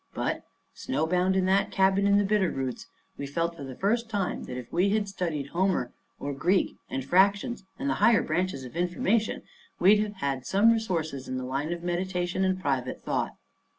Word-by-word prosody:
But, - - -2 0.3
snowbound 180 +6 0
in 190 -1 +2
that 190 +1 +2
cabin 195 +1 +3
in 200 0 +5
the 205 - +4
Bitter 200 -2 +2
Roots, 130 -2 -4 0.3
we 140 - -3
felt 165 +4 -1
for 145 - -8
the 130 -2 -7
first 225 - 0
time 200 -4 -2
that 125 - -6
if 125 -2 -9
we 180 +4 +3
had 210 0 +1
studied 165 -8 -3
Homer 180 -8 0 0.3
or 140 0 -3
Greek 180 +7 +1
and 130 -1 -3
fractions 200 - +2
and 280 - -3
the - - +2
higher 230 -3 +5
branches 175 -3 -1
of 125 +4 -10
information, 180 +5 0 0.4
we'd 200 +4 +6
have 210 -1 -2
had 140 -7 -2
some 205 +4 +4
resources 165 - -2
in 130 - -3
the 130 - -4
line 135 +5 -2
of 175 0 -4
meditation 180 +1 -1
and 185 0 +1
private 135 -7 -2
thought. - - -1
180 Hz, 190 wpm, -27 LUFS, 140-200 Hz, 0.4 s, we'd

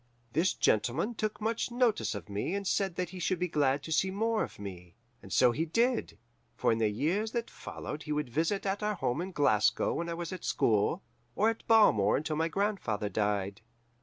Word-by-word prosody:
"This 165 +5 +2
gentleman 130 - +1
took 215 -1 -3
much 225 +2 -1
notice 240 - +1
of 90 -5 -7
me 105 - -2
and 200 0 -3
said 195 -2 0
that 180 -1 -2
he 185 - -8
should 185 +1 0
be 180 +1 -1
glad 145 -3 +1
to 160 - -7
see 160 +5 +2
more 220 +3 0
of - - -7
me. 90 -4 -9 0.3
And - - -13
so 125 -1 +5
he 150 +7 -1
did, 235 +9 0 0.4
for - - +2
in 115 - +1
the 110 -1 +3
years 180 - -1
that 235 -1 -2
followed 150 - -7
he 150 - -6
would 150 -2 -1
visit 165 - -1
at 195 +1 -1
our 210 0 0
home 125 -4 -1
in 185 +2 -5
Glasgow 110 - +2
when 170 0 -3
I 170 - -2
was 170 +1 -5
at 185 - -7
school, 105 -2 +1 0.3
or 220 +3 +3
at 225 - -10
Balmore 110 - +5
until 155 +1 -2
my 160 +2 +1
grandfather 165 - -1
died. 100 0 -1
165 Hz, 210 wpm, -30 LUFS, -, 0.4 s, so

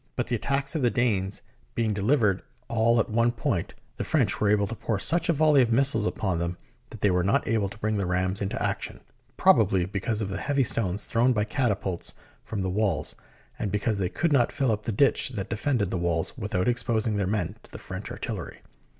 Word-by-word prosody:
But - - -1
the 120 - -1
attacks 140 +4 -1
of 155 - -1
the 120 - +4
Danes 105 -6 0 0.3
being 115 -2 +1
delivered 105 -2 +2 0.3
all 115 0 +3
at 110 - 0
one 115 +2 +3
point, 120 - -2 0.2
the - - -2
French - - +1
were 105 - +3
able 105 -1 +3
to 110 - -5
pour 110 -1 -2
such 165 - 0
a - - +5
volley 150 -2 +5
of 120 -2 +1
missiles 130 -3 +3
upon 95 -6 -1
them 85 +1 -2 0.3
that 110 - -11
they 100 - +3
were 90 -1 +2
not 100 - +1
able 110 -3 +1
to 115 - -11
bring 110 0 -1
the 100 -2 -1
rams 90 +2 -1
into 100 - -2
action, - - -3 0.4
probably 90 -2 +4
because 100 +3 -2
of 100 - -4
the 95 0 -3
heavy 140 +2 +1
stones 105 -3 0
thrown 120 +3 +2
by 105 -2 +1
catapults 105 -6 -2 0.3
from 100 -3 -4
the - - -1
walls, 105 +1 0 0.5
and 100 - -2
because 105 0 0
they 90 -2 0
could 170 - 0
not 120 -4 +3
fill 135 -5 +1
up 105 -1 -2
the 115 - -1
ditch 135 +6 +3
that 100 -1 -4
defended 115 -3 0
the 95 - -1
walls 85 -2 -1
without 95 -3 -2
exposing 115 -3 +1
their 100 -2 0
men 105 +1 -1
to - - -18
the - - -8
French - - -6
artillery. - - -6
105 Hz, 220 wpm, -26 LUFS, 95-120 Hz, 0.5 s, a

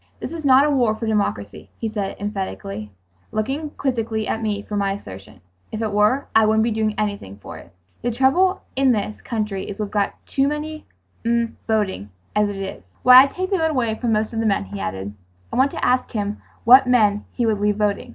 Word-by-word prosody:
"This - - -5
is 330 -1 -6
not 270 0 +6
a - - +2
war 240 -6 +2
for 225 - -5
democracy," 200 - -2
he 225 - -3
said 210 -3 -3
emphatically, 105 - -5 0.4
looking 270 +8 -2
quizzically 225 -5 -1
at 225 - -2
me 205 -2 -2
for 210 - -6
my 200 -1 +1
assertion; 100 - -11 0.3
"if 215 - -4
it 220 -2 -1
were, 210 +7 +2
I 220 - +6
wouldn't 220 0 +3
be 230 - +1
doing 215 -1 0
anything 200 - -3
for 85 -5 -10
it…. 85 - -16 0.3
The 240 - -1
trouble 270 +11 +2
in 265 -1 +4
this 210 0 -3
country 210 -5 -3
is 200 +1 -7
we've 210 -2 -3
got 205 -1 0
too 275 0 +1
many 305 +1 -4 0.4
mm 235 0 +1 0.2
voting 205 - -1 0.3
as 210 0 +3
it 205 - -5
is. 195 - -6 0.2
Why, 250 0 +9
I'd 275 - +2
take 370 +2 -4
the 385 - +2
vote 320 0 +2
away 250 -7 0
from 235 +1 -2
most 215 +1 0
of 225 - -2
the 225 - +1
men," 200 - +1
he 100 +1 -7
added. 95 +1 -4 0.4
I - - -1
wanted 265 +2 +3
to - - -1
ask 255 0 +2
him 205 -1 -3 0.2
what 255 +3 +7
men 210 -5 +3
he 240 - 0
would 215 -2 +1
leave 205 0 +1
voting. 210 +3 -1
215 Hz, 220 wpm, -21 LUFS, 200-250 Hz, 0.4 s, Why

